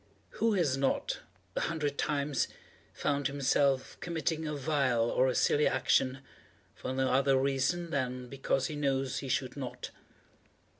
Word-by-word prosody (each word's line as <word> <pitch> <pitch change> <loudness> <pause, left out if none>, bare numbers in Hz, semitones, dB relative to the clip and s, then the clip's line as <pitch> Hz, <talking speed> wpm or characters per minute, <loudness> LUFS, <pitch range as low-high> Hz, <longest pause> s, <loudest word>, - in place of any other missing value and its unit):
Who 225 0 +3
has 160 -9 +2
not, 135 0 0 0.4
a - - +1
hundred 150 -4 -1
times, 140 -2 0 0.4
found 145 -1 0
himself 140 -1 +1
committing 160 -1 -2
a 150 - -2
vile 135 -5 +1
or 130 - +3
a 130 - 0
silly 150 - +3
action, 130 +1 +2 0.5
for - - -5
no 130 0 +1
other 135 +1 +4
reason 140 +6 0
than 125 -2 -2
because 135 0 -1
he 150 - -3
knows 135 -2 0
he 135 - -6
should 130 -1 -1
not? 130 -4 -6
135 Hz, 145 wpm, -31 LUFS, 130-150 Hz, 0.5 s, other